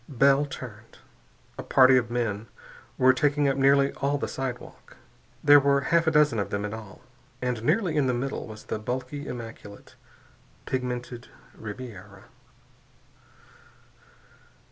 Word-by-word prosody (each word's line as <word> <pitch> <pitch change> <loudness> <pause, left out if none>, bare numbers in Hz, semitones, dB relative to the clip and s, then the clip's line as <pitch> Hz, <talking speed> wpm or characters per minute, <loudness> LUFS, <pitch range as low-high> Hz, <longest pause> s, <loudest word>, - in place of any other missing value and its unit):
Bell 140 +2 +3
turned. 110 -6 -10 0.6
A - - -1
party 130 0 +5
of 120 -2 +1
men 115 -3 -2 0.5
were 130 0 +5
taking 145 +2 +1
up 135 - +1
nearly 140 0 +3
all 140 +1 -1
the - - -3
sidewalk. 130 -2 -7 0.5
There 145 0 +8
were 140 0 +2
half 170 0 +3
a - - +4
dozen 150 -7 +3
of 100 - -2
them 100 0 -2
in 105 - -5
all. 110 -3 -10 0.4
And 125 -3 -2
nearly 175 - +1
in 145 -3 +2
the 125 - +1
middle 135 +1 -4
was 110 -1 -10
the - - -4
bulky, 130 +5 -5
immaculate, 115 -4 -9 0.7
pigmented 125 -1 -4 0.3
Ribiera. 110 -3 -9
130 Hz, 135 wpm, -26 LUFS, 115-140 Hz, 0.7 s, There